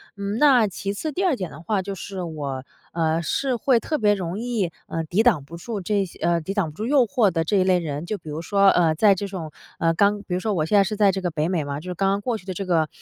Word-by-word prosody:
嗯， 200 Hz, +1 st, -3 dB
那 255 Hz, -8 st, +5 dB
其 200 Hz, +2 st, -4 dB
次 310 Hz, +10 st, -4 dB
第 380 Hz, +7 st, -1 dB
二 335 Hz, -7 st, +3 dB
点 185 Hz, -7 st, -5 dB
的 155 Hz, -, -11 dB
话， 195 Hz, +3 st, 0 dB
就 195 Hz, +1 st, -5 dB
是 190 Hz, +1 st, -6 dB
我， 145 Hz, -5 st, -5 dB, 0.3 s
呃， 165 Hz, 0 st, +1 dB
是 255 Hz, -, -1 dB
会 250 Hz, +1 st, +3 dB
特 310 Hz, -, -1 dB
别 210 Hz, -4 st, +3 dB
容 185 Hz, +1 st, -4 dB
易， 225 Hz, -8 st, -1 dB, 0.2 s
呃， 165 Hz, 0 st, -3 dB
抵 175 Hz, +7 st, +1 dB
挡 215 Hz, -, +3 dB
不 165 Hz, +5 st, -10 dB
住 205 Hz, +3 st, -5 dB
这 200 Hz, +1 st, 0 dB
些 175 Hz, -, -13 dB
呃， 170 Hz, 0 st, +2 dB
抵 180 Hz, +5 st, -5 dB
挡 180 Hz, -7 st, -1 dB
不 150 Hz, -, -20 dB
住 215 Hz, -, -3 dB
诱 270 Hz, -1 st, +4 dB
惑 220 Hz, -1 st, +2 dB
的 165 Hz, -2 st, 0 dB
这 200 Hz, +5 st, +1 dB
一 185 Hz, -, +4 dB
类 185 Hz, -1 st, +3 dB
人， 150 Hz, -2 st, -4 dB
就 210 Hz, +3 st, -3 dB
比 160 Hz, -, -11 dB
如 150 Hz, +2 st, -4 dB
说， 200 Hz, +3 st, +3 dB
呃， 170 Hz, -4 st, +3 dB
在 205 Hz, +3 st, +5 dB
这 200 Hz, +2 st, -4 dB
种 170 Hz, -5 st, -6 dB, 0.3 s
呃， 165 Hz, 0 st, +2 dB
刚 205 Hz, +4 st, +2 dB
比 195 Hz, -3 st, -6 dB
如 180 Hz, -, 0 dB
说 210 Hz, +2 st, -1 dB
我 155 Hz, -4 st, 0 dB
现 185 Hz, -, 0 dB
在 200 Hz, -, +7 dB
是 210 Hz, +2 st, -3 dB
在 205 Hz, -2 st, +4 dB
这 190 Hz, 0 st, -3 dB
个 180 Hz, -, -1 dB
北 155 Hz, 0 st, -1 dB
美 175 Hz, -4 st, 0 dB
嘛， 140 Hz, 0 st, -4 dB
就 180 Hz, +4 st, -9 dB
是 -, -, -2 dB
刚 195 Hz, +2 st, +1 dB
刚 200 Hz, +1 st, 0 dB
过 235 Hz, +1 st, -1 dB
去 190 Hz, -, -16 dB
的 190 Hz, -, -4 dB
这 195 Hz, +2 st, -4 dB
个 165 Hz, -4 st, +2 dB
190 Hz, 325 characters per minute, -23 LUFS, 165-210 Hz, 0.3 s, 在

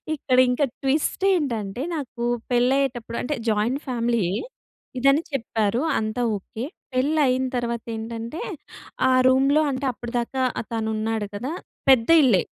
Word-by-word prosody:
ఇక్కడ 255 Hz, -3 st, 0 dB
ఇంకా 250 Hz, +3 st, +2 dB, 0.2 s
ట్విస్ట్ 290 Hz, +7 st, 0 dB
ఏంటంటే, 235 Hz, -, -2 dB
నాకు 250 Hz, -5 st, -5 dB, 0.3 s
పెళైయ్యేటప్పుడు 245 Hz, -1 st, +1 dB
అంటే 295 Hz, +4 st, -2 dB
జాయింట్ 225 Hz, +7 st, 0 dB
ఫ్యామిలీ 235 Hz, -4 st, 0 dB, 0.7 s
ఇదని 275 Hz, +4 st, +4 dB
చెప్పారు. 225 Hz, -2 st, 0 dB, 0.2 s
అంతా 215 Hz, +2 st, -2 dB, 0.2 s
ఓకే 220 Hz, +4 st, -8 dB, 0.3 s
.పెళైన 260 Hz, -1 st, +2 dB
తరువాత 235 Hz, -1 st, -2 dB
ఏంటంటే, 230 Hz, -, -5 dB, 0.7 s
ఆ -, -, +4 dB, 0.2 s
రూమ్‌లో 270 Hz, +3 st, +4 dB
అంటే 265 Hz, +1 st, -3 dB
అప్పటిదాకా 240 Hz, +2 st, -3 dB, 0.3 s
తను 220 Hz, -1 st, -1 dB
ఉన్నాడు 220 Hz, -1 st, -1 dB
కదా. 250 Hz, +9 st, -4 dB, 0.4 s
పెద్ద 250 Hz, -2 st, +5 dB
ఇల్లే. 215 Hz, -8 st, +4 dB
245 Hz, 120 wpm, -24 LUFS, 225-270 Hz, 0.7 s, పెద్ద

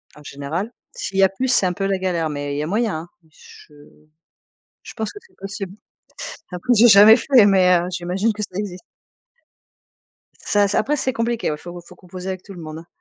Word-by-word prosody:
En 150 Hz, -, -15 dB
général. 150 Hz, +11 st, -5 dB, 0.2 s
S'il 195 Hz, -, -5 dB
y 195 Hz, -, +5 dB
a 190 Hz, -, +5 dB
plus 255 Hz, +7 st, -3 dB
c'est 245 Hz, -6 st, +3 dB
un 180 Hz, -, 0 dB
peu 195 Hz, +2 st, -3 dB
la 195 Hz, -1 st, 0 dB
galère 175 Hz, -4 st, -1 dB
mais 145 Hz, -1 st, -4 dB
il -, -, -3 dB
y 150 Hz, -, -1 dB
a -, -, -4 dB
moyen, 215 Hz, +2 st, 0 dB
hein. 170 Hz, -, -13 dB
Mais 160 Hz, -, -27 dB
je 150 Hz, -, -17 dB, 1.1 s
je -, -, -11 dB
pense 220 Hz, -2 st, -4 dB
que 415 Hz, -, -10 dB
c'est 470 Hz, -, -25 dB
possible. 195 Hz, -1 st, -7 dB, 0.8 s
Après 180 Hz, +8 st, -1 dB
j'ai 235 Hz, +2 st, +6 dB
jamais 210 Hz, +2 st, +9 dB
fait 245 Hz, -2 st, +5 dB
mais, 185 Hz, -2 st, +5 dB
heu, 175 Hz, -, -3 dB
j'imagine 185 Hz, +5 st, -1 dB
que 210 Hz, -, -6 dB
ça 185 Hz, -3 st, -7 dB
existe. 190 Hz, -3 st, -5 dB, 1.6 s
Ça 205 Hz, 0 st, +1 dB
s 200 Hz, -, -2 dB
après 290 Hz, +7 st, +1 dB
c'est 260 Hz, -2 st, -1 dB
compliqué, 230 Hz, -4 st, -1 dB
ouais, 150 Hz, -, -4 dB
faut 175 Hz, +2 st, -9 dB
faut 175 Hz, +1 st, -16 dB
composer 185 Hz, +1 st, -9 dB
avec 185 Hz, -1 st, -5 dB
tout 200 Hz, -, -11 dB
le 175 Hz, -, -10 dB
monde, 155 Hz, 0 st, -8 dB
hein. 165 Hz, -, -15 dB
190 Hz, 220 wpm, -21 LUFS, 175-215 Hz, 1.6 s, jamais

